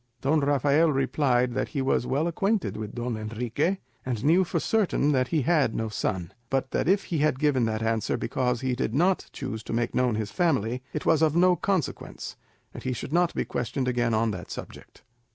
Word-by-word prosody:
Don 150 +4 +2
Rafael 145 +3 +3
replied 130 -2 +1
that - - -1
he 140 - -3
was 130 -2 +1
well 145 +5 +1
acquainted 195 +4 0
with 110 -1 -6
Don 120 -1 -2
Enrique, 115 - -1 0.3
and 125 -1 -3
knew 170 +5 +5
for 175 - -1
certain 195 -9 +1
that 130 -2 +2
he 155 -2 0
had 150 -7 +2
no 110 0 -2
son; 95 -3 -3 0.2
but 135 -1 -1
that - - 0
if 195 +1 +3
he 165 - -2
had 150 -3 +2
given 135 -4 +2
that 110 0 -2
answer 115 -1 0
because 125 0 -1
he 130 -1 0
did 120 -1 -2
not 180 +5 +2
choose 130 -5 -5
to 115 - -6
make 120 +1 0
known 125 -3 +2
his 110 -1 -3
family, 130 - 0
it 150 - -4
was 160 - +3
of 155 -1 +3
no 180 +1 +5
consequence, 185 -5 -3 0.4
and - - -8
he 130 - -2
should 125 +4 -6
not 175 0 +2
be - - -1
questioned 125 +2 -2
again 120 -2 +1
on 110 0 +1
that 90 -3 -7
subject. - - -10
130 Hz, 205 wpm, -26 LUFS, 115-155 Hz, 0.4 s, knew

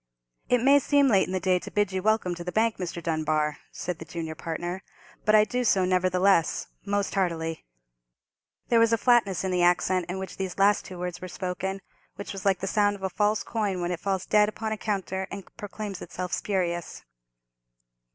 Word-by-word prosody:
"It 245 -1 +3
may 280 +2 +6
seem 285 0 +3
late 195 -5 +4
in - - -6
the 185 - 0
day 185 0 +2
to - - -8
bid 205 -2 +1
you 190 0 -2
welcome 215 -3 +1
to 175 0 -7
the 180 - -4
bank, 220 +2 +1
Mr. 170 -2 -5
Dunbar," 155 -2 0
said 180 -2 -5
the - - -6
junior 160 -1 -5
partner, 175 +3 -4 0.4
"but 215 +1 +5
I 210 - +7
do 250 +3 -1
so, 195 -5 +3
nevertheless—most 185 +2 +1
heartily!" 165 -4 -1 1.0
There 235 - +5
was 230 0 +4
a 230 - +4
flatness 225 -7 +3
in 190 - -1
the 180 -1 +1
accent 180 0 +2
in 180 - -3
which 190 -2 -6
these 190 -2 -3
two - - -12
last 200 0 +3
words 180 -1 -5
were 185 - -5
spoken, 190 +2 -4 0.3
which 200 - -6
was 195 -1 -7
like 190 -2 +2
the - - -1
sound 205 +1 +2
of 195 - -12
a 190 - -1
false 210 +2 +1
coin 205 -5 -2
when 175 0 -2
it 175 - -3
falls 190 0 -1
dead 210 0 +4
upon 220 0 -4
a 215 - -1
counter 190 -2 -2
and 200 -1 -9
proclaims 205 -2 -6
itself 180 +1 -5
spurious. 175 -4 -2
190 Hz, 200 wpm, -27 LUFS, 180-210 Hz, 1.0 s, I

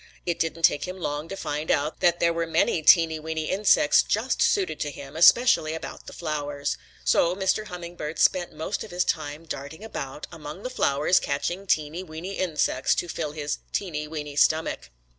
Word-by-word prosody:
It 170 -2 -1
didn't 165 0 -2
take 145 +1 +3
him 185 +1 -6
long 150 -3 -3
to 195 - -6
find 150 -3 -4
out 150 +2 0
that 175 0 +3
there 170 0 +3
were 165 0 -2
many 165 0 +2
teeny, 160 0 +5
weeny 160 0 -3
insects 200 +3 +4
just - - -1
suited 390 -2 +2
to 150 - -2
him, 140 0 -10
especially 170 -2 +5
about 160 - -8
the - - -7
flowers. 145 -3 -3 0.3
So 170 +1 +3
Mr. 190 +2 0
Hummingbird 170 -4 -6
spent 180 +1 +2
most 160 +6 -4
of 220 - -10
his 180 0 0
time 155 0 -3
darting 160 +4 -7
about 150 -9 -6
among 160 +3 -9
the 255 - -4
flowers 150 - +2
catching 175 +7 -3
teeny, 155 +1 0
weeny 180 +2 -7
insects 155 -7 +1
to 175 - -2
fill 155 -3 -4
his 150 -1 -3
teeny, 155 -6 -2
weeny 150 -2 -6
stomach. 155 +2 +1
160 Hz, 180 wpm, -25 LUFS, 150-180 Hz, 0.3 s, teeny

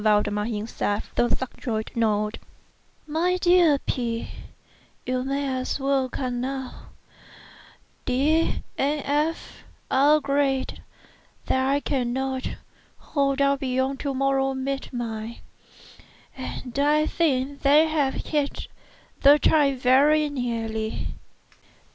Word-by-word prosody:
Valdemar 210 -1 +2
himself, 210 -2 -3
the 240 - +2
subjoined 235 -3 -3
note: 215 -2 0 0.7
MY 335 +4 0
DEAR 350 -4 +5
P——, 235 -4 -3 0.8
You 255 0 -1
may 275 +2 -1
as 255 - -3
well 270 -1 +1
come 250 -1 -3
now. 265 0 -5 1.2
D—— 295 +6 +1 0.2
and 290 +2 +1
F—— 300 +3 -2 0.3
are 285 +3 +5
agreed 280 -2 0 0.6
that 260 0 +1
I 285 +1 +2
cannot 260 0 -1 0.5
hold 280 -1 0
out 280 0 +2
beyond 260 +1 -1
to 280 -2 -2
morrow 270 0 +1
midnight; 240 -4 -4 0.9
and 260 0 -6
I 300 +2 +3
think 280 -4 0
they 295 +3 +6
have 295 -4 0
hit 295 -2 -2 0.5
the 285 +1 +8
time 290 -3 +3
very 285 +5 +4
nearly. 225 -5 -3
270 Hz, 105 wpm, -25 LUFS, 245-285 Hz, 1.2 s, the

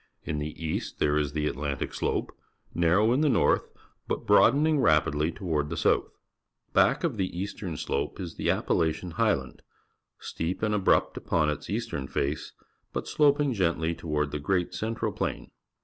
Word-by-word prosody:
In 75 0 -3
the 75 +1 -5
east 80 -1 -3
there 75 -1 +2
is 75 -1 -2
the 75 -1 -1
Atlantic 70 0 -3
Slope, - - -2 0.4
narrow 90 +7 +3
in 135 - +2
the 155 - +3
north, 120 - +2 0.4
but - - -3
broadening 150 +1 +5
rapidly 75 - +2
toward 80 -6 -2
the 85 - -4
south. - - +2 0.6
Back - - +4
of - - 0
the 95 - 0
Atlantic 90 -2 -5
Slope 70 +5 -2
is 90 -4 -5
the - - -2
Appalachian 80 +2 0
Highland, 90 -9 0 0.6
steep 85 +6 -4
and 105 0 +1
abrupt 105 -2 +2
upon 75 -2 +1
its 75 - -6
eastern 65 -1 -3
face, 70 +3 -2 0.4
but - - -4
slop 145 -1 +3
ing 145 -3 +1
gently 85 -5 0
to 85 - -10
ward 75 -1 0
the 75 - -3
Great 90 +4 0
Central 110 0 -2
Plain. - - -4
85 Hz, 165 wpm, -27 LUFS, 75-105 Hz, 0.6 s, broadening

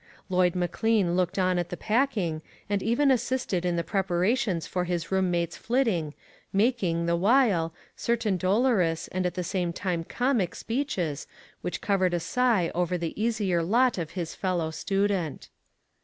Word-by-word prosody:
Lloyd 180 -1 +2
McLean 180 +1 +1
looked 180 0 0
on 185 -1 +2
at 175 0 -3
the 175 - -5
packing, 215 - 0 0.3
and 200 -1 0
even 245 +7 +3
assisted 245 -7 0
in 175 -1 0
the 170 - 0
prepara 190 +3 +1
tions 195 -11 -1
for 180 -1 -2
his 175 -1 -3
room 190 -1 +2
mate's 170 -1 -1
flitting, 220 - 0 0.4
making, 195 -6 +1
the 170 0 +2
while, 195 -4 +3 0.2
certain 230 -4 0
dolorous, 185 -3 +1
and 185 0 -2
the 180 +1 -1
same 175 -1 -1
time 175 -1 -2
comic 240 -3 0
speeches 195 - -2 0.3
which 180 - -4
covered 190 -3 +1
a - - 0
sigh 205 0 +1
over 180 +1 0
the 170 -2 -3
easier 210 -6 +1
lot 235 +6 +2
of 165 -3 -3
his 170 -3 -3
fellow 175 -4 -1
student. 195 -3 -1
185 Hz, 155 wpm, -27 LUFS, 175-225 Hz, 0.4 s, even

